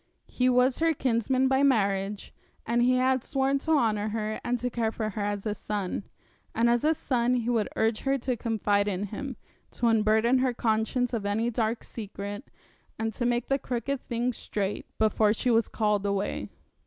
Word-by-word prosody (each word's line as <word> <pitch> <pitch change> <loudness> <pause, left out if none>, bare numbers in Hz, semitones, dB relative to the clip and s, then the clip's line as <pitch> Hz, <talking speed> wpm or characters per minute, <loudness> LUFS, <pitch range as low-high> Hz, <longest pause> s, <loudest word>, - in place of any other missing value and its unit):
He 250 0 +1
was 250 +1 +3
her 325 -1 +2
kinsman 255 +1 +1
by 265 +1 +2
marriage, 200 -6 +1 0.3
and 235 +1 +1
he 250 +1 +4
had 255 0 +2
sworn 270 0 0
to 320 - -3
honour 215 -7 +2
her 215 0 -3
and 245 0 0
to 250 +1 -3
care 225 -2 0
for 215 -1 -3
her 210 - -4
as 205 0 -2
a 210 - 0
son; 205 -1 -4 0.5
and 230 +1 +3
as 235 0 +2
a 315 +1 +3
son 250 -3 +1
he 240 0 0
would 225 -3 +1
urge 220 0 +1
her 275 0 0
to 250 0 -2
confide 210 -3 0
in 195 -1 -1
him, 235 +6 -5 0.3
to 240 - -3
unburden 225 +2 +3
her 255 -1 +1
conscience 230 +2 0
of 225 -3 -1
any 220 +4 0
dark 225 0 -1
secret, 205 +1 -7 0.5
and 220 0 -2
to 240 +3 -1
make 240 0 0
the 275 +1 +1
crooked 260 +2 -3
things 240 +1 -2
straight, 200 -1 -3
before 215 -1 +3
she 245 +2 0
was 225 -1 +3
called 210 -2 0
away. 200 0 -2
230 Hz, 190 wpm, -27 LUFS, 210-250 Hz, 0.5 s, he